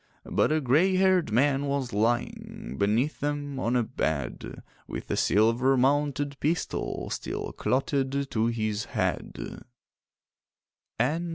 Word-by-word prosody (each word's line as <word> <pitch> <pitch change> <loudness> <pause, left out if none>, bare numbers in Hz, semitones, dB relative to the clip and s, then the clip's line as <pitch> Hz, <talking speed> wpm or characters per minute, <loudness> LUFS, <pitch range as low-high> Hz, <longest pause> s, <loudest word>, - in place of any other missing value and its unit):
But - - +1
a 155 0 +2
grey 155 +9 +3
haired 185 - +3
man 140 +4 +2
was 140 -3 -1
lying 110 - -1
Beneath 110 +9 +1
them 145 -1 -2
on 120 0 0
a 120 - +3
bed, 70 - -3 0.2
With - - -6
a - - +1
silver 115 +6 +3
mounted 140 +1 +1
pistol 160 +3 -2
Still - - -4
clotted 135 +1 0
to 110 0 +1
his 110 -3 -1
head. - - -2
135 Hz, 115 wpm, -27 LUFS, 115-145 Hz, 0.2 s, grey